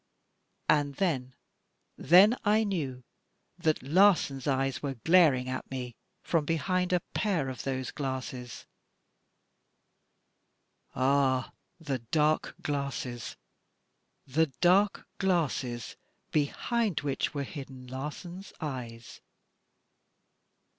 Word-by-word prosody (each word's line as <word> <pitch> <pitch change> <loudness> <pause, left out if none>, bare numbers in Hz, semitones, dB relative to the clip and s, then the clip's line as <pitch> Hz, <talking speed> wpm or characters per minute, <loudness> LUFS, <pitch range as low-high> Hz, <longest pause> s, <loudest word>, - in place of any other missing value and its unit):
And 145 -2 +2
then 130 -9 -1 0.3
— - - -33
^then 200 +7 +8
I 215 +1 +4
knew 145 - -3 0.6
that 160 -5 +1
Larsan's 150 -4 +3
eyes 135 -1 0
were 140 -2 -3
glaring 145 -2 +4
at 130 0 -4
me 125 -2 -5 0.3
from 165 -3 +1
behind 180 +4 0
a 180 -1 +2
pair 175 -11 0
of 130 - -6
those 130 -2 -3
glasses 130 -3 -5 1.5
— - - -43
ah! 130 -1 +2 0.3
the 140 -5 -3
dark 150 +6 +1
glasses, 140 -4 -3 0.4
— - - -48
the 160 0 +4
dark 195 +4 +3
glasses 140 - -1 0.4
behind 200 - 0
which 140 +1 -2
were 140 - -1
hidden 135 -2 -8
Larsan's 150 +9 -7
eyes. 120 -6 -6
140 Hz, 100 wpm, -29 LUFS, 130-175 Hz, 1.5 s, ^then